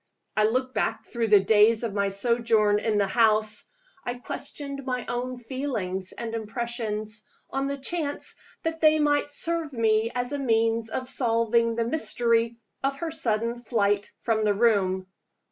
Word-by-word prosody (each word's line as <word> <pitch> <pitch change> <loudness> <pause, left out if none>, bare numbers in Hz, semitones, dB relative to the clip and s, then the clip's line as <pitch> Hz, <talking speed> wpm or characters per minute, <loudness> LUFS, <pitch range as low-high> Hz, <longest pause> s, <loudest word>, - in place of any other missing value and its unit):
I 215 - +4
looked 255 +3 0
back - - -1
through 235 -2 -2
the 210 -1 +7
days 220 +2 +5
of 225 -4 -2
my 200 -1 +1
sojourn 215 0 +2
in 215 -1 0
the 200 - +3
house; 215 0 +2 0.4
I 245 - -3
questioned 280 +2 -5
my 250 -2 -2
own 250 +1 -3
feelings 225 -8 -3
and 230 -1 -6
impressions, 220 -1 -3 0.3
on 270 0 -1
the 280 0 -2
chance 290 +1 -2 0.3
that 325 0 -2
they 310 -1 +6
might 290 -1 +2
serve 325 +1 -2
me 225 -1 +2
as 245 0 -1
a 285 - -2
means 225 -3 +1
of 255 +3 -3
solving 230 -2 +1
the 230 0 0
mystery 235 -4 +1 0.3
of 275 0 0
her 325 +2 -3
sudden 235 -5 -1
flight 205 -4 +1
from 220 -2 +1
the 205 -1 +2
room. 195 -4 +2
230 Hz, 160 wpm, -26 LUFS, 215-260 Hz, 0.4 s, the